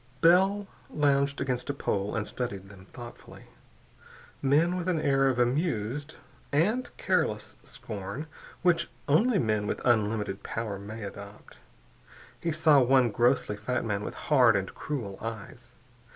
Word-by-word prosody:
Bell 190 Hz, +4 st, +4 dB, 0.2 s
lounged 140 Hz, -1 st, +1 dB
against 130 Hz, 0 st, -2 dB
a 140 Hz, -, -1 dB
pole 100 Hz, -6 st, -2 dB
and 110 Hz, -1 st, -1 dB
studied 100 Hz, -5 st, -5 dB
them 95 Hz, -2 st, -14 dB
thoughtfully. 120 Hz, -2 st, -11 dB, 1.0 s
Men 155 Hz, +6 st, +3 dB
with 180 Hz, -1 st, -3 dB
an 175 Hz, -3 st, +1 dB
air 135 Hz, -2 st, +3 dB
of 130 Hz, -, -1 dB
amused 135 Hz, -, -1 dB, 0.4 s
and 210 Hz, -, +1 dB
careless -, -, 0 dB
scorn 100 Hz, +8 st, -7 dB, 0.4 s
which 170 Hz, -2 st, +2 dB, 0.2 s
only 200 Hz, -, +4 dB
men 110 Hz, -, 0 dB
with -, -, -2 dB
unlimited 105 Hz, -4 st, +1 dB
power 110 Hz, -4 st, -4 dB
may 105 Hz, +2 st, -8 dB
adopt. 100 Hz, +1 st, -10 dB, 0.8 s
He 165 Hz, -, -1 dB
saw 155 Hz, -2 st, +5 dB
one 130 Hz, -2 st, +4 dB
grossly 120 Hz, -1 st, +2 dB
fat 120 Hz, +4 st, -2 dB
man 105 Hz, -2 st, -1 dB
with -, -, -6 dB
hard 125 Hz, -7 st, +4 dB
and 95 Hz, -1 st, -2 dB
cruel 115 Hz, -10 st, -5 dB
eyes. 115 Hz, +2 st, -7 dB
125 Hz, 135 wpm, -28 LUFS, 105-150 Hz, 1.0 s, saw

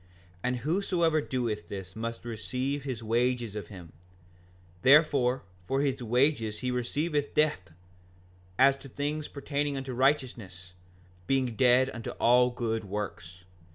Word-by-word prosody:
5:42 90 Hz, -, -28 dB, 0.4 s
And 125 Hz, 0 st, +1 dB
whosoever 165 Hz, -, +1 dB
doeth 120 Hz, -7 st, -3 dB
this 95 Hz, -2 st, -7 dB
must 115 Hz, +1 st, -5 dB
receive 130 Hz, +5 st, -3 dB
his 125 Hz, -5 st, -4 dB
wages 120 Hz, -1 st, 0 dB
of 105 Hz, -4 st, -5 dB
him; 90 Hz, -5 st, -11 dB, 0.9 s
therefore, 135 Hz, -, +4 dB, 0.2 s
for 135 Hz, +1 st, +1 dB
his 135 Hz, -2 st, -1 dB
wages 120 Hz, -2 st, +1 dB
he 125 Hz, -1 st, -1 dB
receiveth 145 Hz, +4 st, -1 dB
death, 150 Hz, -, +1 dB, 0.9 s
as 135 Hz, +1 st, +6 dB
to 135 Hz, 0 st, -12 dB
things 145 Hz, +3 st, -3 dB
pertaining 140 Hz, 0 st, -2 dB
unto 135 Hz, -1 st, -5 dB
righteousness, 120 Hz, -9 st, -1 dB, 0.5 s
being 130 Hz, -4 st, +1 dB
dead 130 Hz, +2 st, +4 dB
unto 115 Hz, 0 st, -6 dB
all 125 Hz, +1 st, +5 dB
good 115 Hz, -2 st, -2 dB
works. 100 Hz, -3 st, -6 dB
125 Hz, 130 wpm, -29 LUFS, 110-140 Hz, 0.9 s, as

